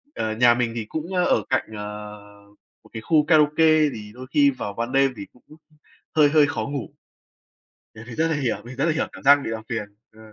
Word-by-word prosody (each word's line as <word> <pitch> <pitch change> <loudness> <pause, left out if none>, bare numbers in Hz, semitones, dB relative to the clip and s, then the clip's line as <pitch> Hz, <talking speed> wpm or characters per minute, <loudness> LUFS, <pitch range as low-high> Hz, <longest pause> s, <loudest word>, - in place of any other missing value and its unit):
Ờ, 110 0 -2
nhà 120 +1 +5
mình 120 -1 -1
thì 115 -2 -4
cũng, 160 +4 -5
ờ, 180 -1 +2
ở - - +2
cạnh, - - -1
ờ, 105 0 -8 0.6
một - - -20
cái 110 - -6
khu 150 +4 +2
karaoke, 155 0 +4
thì 105 -1 -9
đôi 130 +2 -10
khi 145 -1 +5
vào 125 -6 -6
ban 115 +4 -4
đêm 135 0 +2
thì 100 - -7
cũng 125 - -24 0.7
hơi 150 -2 +5
hơi 150 -1 +4
khó 150 - -3
ngủ, 140 -3 -5 1.1
mình 110 0 -11
thì 120 - -8
rất 160 +7 0
là 160 - 0
hiểu, 130 -6 -1
mình 125 +2 -10
rất 135 - 0
là 165 - +2
hiểu 155 - -2
cảm - - -12
giác 140 +1 +7
bị - - -4
làm 110 0 -5
phiền, 115 -3 -3 0.3
ờ. 110 - -21
130 Hz, 230 wpm, -23 LUFS, 110-150 Hz, 1.1 s, giác